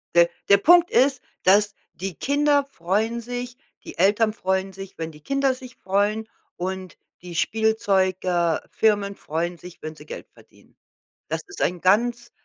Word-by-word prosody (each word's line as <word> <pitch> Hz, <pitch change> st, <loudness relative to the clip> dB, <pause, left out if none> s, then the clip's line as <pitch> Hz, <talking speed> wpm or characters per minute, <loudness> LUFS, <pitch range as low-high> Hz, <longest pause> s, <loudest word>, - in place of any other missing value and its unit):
Der 170 Hz, 0 st, +6 dB, 0.2 s
der 200 Hz, -, +8 dB
Punkt 345 Hz, -, +6 dB
ist, 265 Hz, -1 st, +3 dB, 0.2 s
dass 205 Hz, +2 st, +4 dB, 0.2 s
die 190 Hz, -1 st, -5 dB
Kinder 285 Hz, -, +2 dB
freuen 225 Hz, -1 st, -1 dB
sich, 245 Hz, +1 st, -6 dB, 0.3 s
die -, -, -10 dB
Eltern 210 Hz, +4 st, +3 dB
freuen 190 Hz, -2 st, -1 dB
sich, 195 Hz, 0 st, -10 dB
wenn 165 Hz, 0 st, -4 dB
die 150 Hz, -, -16 dB
Kinder 275 Hz, -, +1 dB
sich 255 Hz, -1 st, -11 dB
freuen 205 Hz, +3 st, 0 dB, 0.3 s
und 185 Hz, 0 st, -5 dB, 0.2 s
die 175 Hz, -1 st, -9 dB
Spielzeug 195 Hz, -2 st, +1 dB
äh, 175 Hz, -3 st, +1 dB
Firmen 205 Hz, -2 st, +1 dB
freuen 170 Hz, +2 st, -3 dB
sich, 180 Hz, +1 st, -13 dB
wenn 155 Hz, 0 st, -6 dB
sie -, -, -14 dB
Geld -, -, -8 dB
verdienen. -, -, -22 dB, 0.5 s
Das -, -, -2 dB
ist 390 Hz, -, -8 dB
ein 180 Hz, -1 st, 0 dB
ganz 235 Hz, +5 st, +2 dB
200 Hz, 160 wpm, -24 LUFS, 185-240 Hz, 0.5 s, der